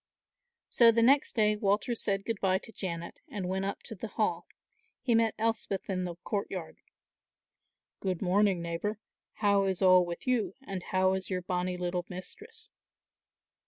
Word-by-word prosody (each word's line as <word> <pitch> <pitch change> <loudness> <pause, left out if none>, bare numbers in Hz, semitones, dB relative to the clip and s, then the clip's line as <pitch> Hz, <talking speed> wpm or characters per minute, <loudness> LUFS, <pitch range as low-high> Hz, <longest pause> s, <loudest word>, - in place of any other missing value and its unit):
So 235 -1 +6
the 230 0 +3
next 275 +4 +4
day 215 -2 +3
Walter 210 +3 +1
said 200 -3 -1
good 225 -3 -2
bye 190 -1 +3
to 215 - -11
Janet 170 -3 -5
and 190 -3 -4
went 190 +1 -1
up 195 - -4
to 225 - -5
the 220 +2 -6
Hall. - - -1 0.5
He 240 - +1
met 225 -1 +3
Elspeth 220 -3 -1
in 185 -1 -1
the 175 -1 -5
courtyard. 195 -5 -4 1.2
"Good 185 -3 -2
morning, 190 -1 +2
neighbour, 170 +6 -2 0.5
how 200 -1 +4
is 190 -2 -1
all 185 -1 +6
with 175 -1 -6
you 250 -4 0
and 195 -7 -5
how 185 +1 +2
is 190 0 -3
your 180 -2 -2
bonnie 180 0 -1
little 180 0 -2
mistress?" 440 - -9
195 Hz, 160 wpm, -30 LUFS, 185-220 Hz, 1.2 s, So